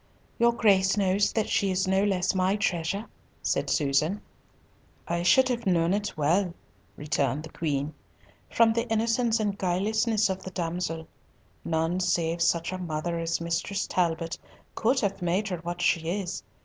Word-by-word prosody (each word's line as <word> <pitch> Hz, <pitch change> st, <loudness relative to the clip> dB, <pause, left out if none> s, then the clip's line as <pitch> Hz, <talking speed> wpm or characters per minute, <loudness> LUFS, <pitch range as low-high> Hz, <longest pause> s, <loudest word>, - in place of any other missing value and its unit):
"Your 235 Hz, 0 st, +5 dB
Grace 195 Hz, -4 st, +3 dB
knows 200 Hz, +1 st, +2 dB
that 220 Hz, -2 st, 0 dB
she 200 Hz, -, +1 dB
is 185 Hz, 0 st, 0 dB
no 190 Hz, +1 st, +2 dB
less 190 Hz, -3 st, +1 dB
my 190 Hz, +1 st, +2 dB
treasure," 195 Hz, +1 st, -1 dB, 0.4 s
said -, -, 0 dB
Susan. 150 Hz, +6 st, +1 dB, 0.9 s
"I 170 Hz, 0 st, -1 dB
should 260 Hz, +9 st, +5 dB
have 235 Hz, -3 st, -2 dB
known 170 Hz, -1 st, +3 dB
it 205 Hz, -4 st, -2 dB
well," 170 Hz, +4 st, +1 dB, 0.4 s
returned 145 Hz, -1 st, -1 dB
the 160 Hz, -, -10 dB
Queen, 145 Hz, -2 st, -2 dB, 0.6 s
"from 230 Hz, -1 st, +4 dB
the 235 Hz, +1 st, -2 dB
innocence 230 Hz, +1 st, +1 dB
and 205 Hz, -2 st, 0 dB
guilelessness 215 Hz, +4 st, +1 dB
of 190 Hz, -1 st, -3 dB
the 190 Hz, -, -7 dB
damsel. 165 Hz, -2 st, -3 dB, 0.6 s
None 165 Hz, +2 st, 0 dB
save 170 Hz, -2 st, 0 dB
such 170 Hz, 0 st, +1 dB
a 185 Hz, -, -4 dB
mother 170 Hz, 0 st, -3 dB
as 165 Hz, 0 st, -1 dB
Mistress 170 Hz, +4 st, -2 dB
Talbot 165 Hz, -2 st, -1 dB, 0.3 s
could 250 Hz, +4 st, +1 dB
have 200 Hz, -3 st, -1 dB
made 185 Hz, +4 st, 0 dB
her 180 Hz, -, -2 dB
what 175 Hz, +1 st, -5 dB
she 165 Hz, -1 st, +2 dB
is. 185 Hz, 0 st, -3 dB
185 Hz, 160 wpm, -27 LUFS, 165-205 Hz, 0.9 s, Your